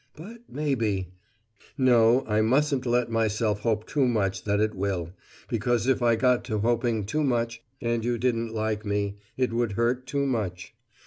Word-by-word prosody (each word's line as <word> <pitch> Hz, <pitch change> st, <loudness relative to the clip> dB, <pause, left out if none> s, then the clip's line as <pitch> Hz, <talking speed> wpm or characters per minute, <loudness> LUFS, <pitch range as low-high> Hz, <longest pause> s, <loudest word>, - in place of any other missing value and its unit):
But 210 Hz, +10 st, -10 dB
maybe 115 Hz, -, -1 dB, 0.7 s
No, 125 Hz, -1 st, +4 dB
I 105 Hz, 0 st, +1 dB
mustn't 130 Hz, +3 st, +2 dB
let 120 Hz, -1 st, +1 dB
myself 110 Hz, -2 st, 0 dB
hope 110 Hz, 0 st, -1 dB
too 140 Hz, -3 st, +1 dB
much 105 Hz, -5 st, -1 dB
that 100 Hz, 0 st, +1 dB
it 110 Hz, 0 st, +1 dB
will, 95 Hz, -3 st, -3 dB, 0.3 s
because 120 Hz, 0 st, 0 dB
if 130 Hz, -1 st, +2 dB
I 120 Hz, -1 st, +4 dB
got 125 Hz, +1 st, +2 dB
to 110 Hz, -3 st, -2 dB
hoping 115 Hz, -1 st, 0 dB
too 150 Hz, +9 st, -1 dB
much, 115 Hz, -3 st, -1 dB, 0.2 s
and 115 Hz, -1 st, -1 dB
you 120 Hz, 0 st, 0 dB
didn't 115 Hz, -1 st, 0 dB
like 110 Hz, -1 st, -2 dB
me, 100 Hz, -1 st, -2 dB, 0.2 s
it 125 Hz, -3 st, 0 dB
would 115 Hz, -3 st, 0 dB
hurt 120 Hz, +4 st, 0 dB
too 140 Hz, 0 st, 0 dB
much. 105 Hz, -9 st, -3 dB
115 Hz, 170 wpm, -26 LUFS, 105-125 Hz, 0.7 s, No